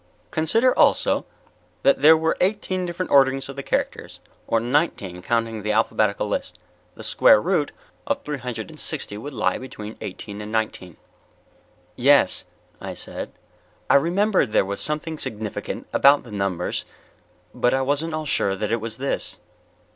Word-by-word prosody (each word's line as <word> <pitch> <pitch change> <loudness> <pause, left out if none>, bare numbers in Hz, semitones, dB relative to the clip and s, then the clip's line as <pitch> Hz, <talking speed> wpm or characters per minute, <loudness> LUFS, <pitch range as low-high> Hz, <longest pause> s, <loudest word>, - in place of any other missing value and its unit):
Consider 225 +11 +3
also - - +3 0.6
that 275 - +4
there 160 +2 +8
were 160 +1 +1
eighteen 185 -2 0
different 175 +1 -4
orderings 135 -1 +4
of 135 - -7
the 140 - -4
characters, - - -3 0.3
or 115 - +2
nineteen 115 - -1
counting 115 +1 -1
the 105 +1 -1
alphabetical 115 - +1
list. - - -3 0.4
The - - -10
square - - +5
root - - 0 0.4
of 285 -1 -1
three 150 -2 -4
hundred 115 -5 -5
and - - -11
sixty 100 - -2
would 135 +8 -7
lie 115 -6 0
between 110 -4 -8
eighteen 100 +2 -7
and 105 0 -7
nineteen." 110 -6 -3 1.0
"Yes," - - +4 0.4
I - - -6
said. - - -7 0.6
I - - +6
remembered 175 - +2
there - - +4
was 100 +1 -4
something 155 +1 -2
significant 105 -1 -4
about 140 +1 +5
the 120 - -12
numbers, 100 -3 -2 0.7
but 125 +1 +2
I 135 - +1
wasn't 145 +4 0
at - - 0
all 155 - -4
sure 100 -8 +1
that 105 +2 -3
it 115 -1 0
was 115 0 -5
this. 135 +1 -2
130 Hz, 160 wpm, -23 LUFS, 110-160 Hz, 1.0 s, there